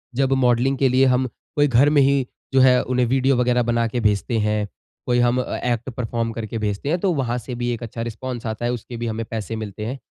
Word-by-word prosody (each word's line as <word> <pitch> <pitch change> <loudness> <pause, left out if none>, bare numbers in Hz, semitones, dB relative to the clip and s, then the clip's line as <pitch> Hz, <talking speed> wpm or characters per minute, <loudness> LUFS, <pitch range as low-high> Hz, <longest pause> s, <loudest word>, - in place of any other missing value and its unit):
जब 135 +1 +2
मॉडलिंग 130 +1 +2
के 135 - +3
लिए 130 +1 +4
हम 130 +1 +1 0.3
कोई 145 0 +4
घर 135 +2 +4
में 150 -1 +4
ही 135 -1 +2 0.3
जो 135 - +5
है 125 -1 +6
उन्हें 125 -1 +1
वीडियो 135 +1 +2
वग़ैरह 125 0 +2
बना 115 0 +2
के 120 +2 -3
भेजते 105 +2 +1
हैं, 105 0 0 0.4
कोई 120 0 +2
हम 120 +1 +3
ए - - -5
एक्ट 120 +3 -5
परफ़ॉर्म 115 -2 -3
करके 115 0 -5
भेजते 105 +5 -2
हैं 170 +3 +1
तो 190 -1 +1
वहाँ 125 -5 -1
से 125 +1 -6
भी 120 0 -2
एक 115 - -6
अच्छा 115 0 -6
रिस्पॉन्स 120 +1 -5
आता 110 +1 -3
है, 120 - +1
उसके 120 0 -6
भी 120 0 -3
हमें 115 0 -3
पैसे 110 -1 -4
मिलते 105 -1 -6
हैं। 130 +4 -4
120 Hz, 245 wpm, -22 LUFS, 115-130 Hz, 0.4 s, है